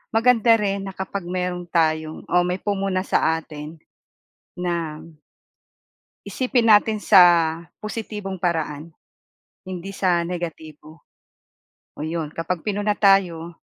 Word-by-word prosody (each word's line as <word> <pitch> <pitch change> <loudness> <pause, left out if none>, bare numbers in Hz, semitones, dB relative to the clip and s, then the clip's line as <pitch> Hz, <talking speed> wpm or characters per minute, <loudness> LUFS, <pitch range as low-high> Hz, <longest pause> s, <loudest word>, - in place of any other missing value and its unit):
maganda 230 -1 +5
rin 200 -2 -1
na 190 - -8
kapag 190 -1 -5
meron 180 -1 -3
tayong 160 -1 0
o - - -3
may 180 - 0
pumuna 195 -1 -2
sa 160 -4 +1
atin 155 0 -8 0.8
na 170 -3 -3 1.2
isipin 250 -3 0
natin 215 0 +4
sa 195 -4 +7 0.6
positibong 210 -3 -5
paraan. 160 -2 -3 0.7
Hindi 185 +1 -7
sa 175 -3 +1
negatibo. 160 -3 -7 0.9
O 150 - -6
yun 160 -1 -3
kapag 165 +1 -2
pinuna 205 +1 -1
tayo, 180 -5 +2
180 Hz, 110 wpm, -22 LUFS, 165-200 Hz, 1.2 s, sa